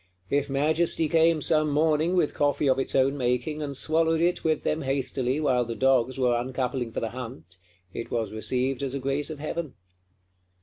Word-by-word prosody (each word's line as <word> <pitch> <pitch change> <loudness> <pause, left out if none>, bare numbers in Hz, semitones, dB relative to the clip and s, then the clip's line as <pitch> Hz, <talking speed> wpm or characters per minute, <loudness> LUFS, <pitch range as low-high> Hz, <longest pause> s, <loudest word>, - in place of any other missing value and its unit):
If 140 0 +1
Majesty 155 +4 +2
came 165 0 +3
some 155 0 +2
morning, 155 +3 +2
with 175 -5 +1
coffee 145 0 +1
of 130 0 +3
its 135 - -2
own 135 +1 +3
making, 125 +4 -1
and 140 -2 -4
swallowed 160 +2 +1
it 175 +2 +1
with 155 -1 0
them 155 - -1
hastily 135 -1 -1
while 130 -5 +2
the 115 -1 -5
dogs 130 0 +2
were 125 -2 +2
uncoupling 125 0 -2
for - - -4
the 115 - -2
hunt, 95 -8 -9 0.3
it 115 - -6
was 110 -3 -2
received 125 +4 -1
as 135 -1 -3
a - - -2
grace 140 +3 -2
of 155 - -6
Heaven. 155 0 -5
135 Hz, 185 wpm, -26 LUFS, 125-155 Hz, 0.3 s, came